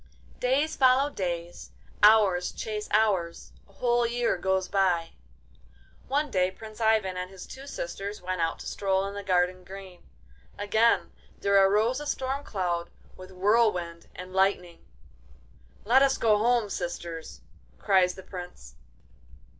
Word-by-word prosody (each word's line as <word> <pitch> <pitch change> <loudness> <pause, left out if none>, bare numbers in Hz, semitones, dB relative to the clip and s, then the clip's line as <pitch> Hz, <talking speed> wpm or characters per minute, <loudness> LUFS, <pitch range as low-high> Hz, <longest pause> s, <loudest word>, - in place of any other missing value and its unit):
Days 275 +5 +1
follow 265 +2 +4
days, 175 -5 -5 0.3
hours 205 -4 +5
chase 210 -1 -5
hours; 195 -6 +1 0.2
a - - -22
whole 240 +1 +1
year 235 0 0
goes 190 +1 0
by. 180 -4 +1 1.0
One 290 +1 0
day 185 -1 +2
Prince 215 +3 -11
Ivan 215 -4 +2
and 180 0 -4
his 190 -1 -10
two 270 +1 -11
sisters 200 -1 -5
went 185 -1 -3
out 165 0 0
to - - -9
stroll 195 -1 0
in 200 - -5
the 200 - -5
garden 185 -1 0
green. 190 -1 -11 0.6
Again 220 +3 +2 0.3
there 200 - -1 0.2
arose 220 +6 +2
a 295 - -6
storm 270 +1 -2
cloud, 175 -7 -2 0.3
with 185 0 -12
whirlwind 185 -4 +1
and 185 0 -9
lightning. 190 -3 0 1.0
'Let 250 +5 +5
us 275 -1 +3
go 215 -2 +3
home, 230 -2 +2
sisters!' 170 -2 -6 0.4
cries 185 -3 +2
the 190 - -11
Prince. 180 - -10
195 Hz, 140 wpm, -27 LUFS, 180-225 Hz, 1.0 s, hours